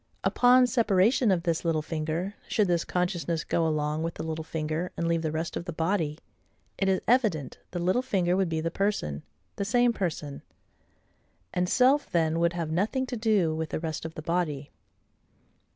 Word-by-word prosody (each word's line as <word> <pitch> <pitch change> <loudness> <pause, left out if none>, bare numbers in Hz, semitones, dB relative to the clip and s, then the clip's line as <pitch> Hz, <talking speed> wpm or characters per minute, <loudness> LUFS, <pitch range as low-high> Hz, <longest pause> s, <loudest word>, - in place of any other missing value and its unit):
Upon 250 +1 +5
separation 230 -1 +3
of 180 -3 +2
this 170 -2 0
little 160 -3 0
finger, 160 +5 -3
should 210 -3 +2
this 175 -1 +1
consciousness 175 -2 -1
go 165 -1 +1
along 150 0 -1
with 165 0 -3
the - - -5
little 160 0 -4
finger, 160 +2 -3
and 170 - -1
leave 165 -1 +1
the 160 -1 -2
rest 160 +2 -3
of 170 - -4
the 175 - -4
body, 160 -2 -1 0.6
it 195 - +2
is 190 - +2
evident 215 - +1
the 175 - -5
little 185 +8 +1
finger 185 -8 +1
would 190 -2 +1
be 160 -1 -1
the 165 +1 -2
person, 175 - -1 0.4
the - - -1
same 240 +3 +3
person; 155 -8 -3 1.1
and 180 0 0
self 265 +3 +3
then 165 -1 +1
would 170 0 +2
have 165 -2 -3
nothing 215 +10 0
to 255 - -5
do 215 -8 +2
with 160 0 -3
the - - -2
rest 160 -2 -4
of 160 0 -7
the 155 - -7
body. 155 -4 -2
170 Hz, 185 wpm, -27 LUFS, 160-200 Hz, 1.1 s, Upon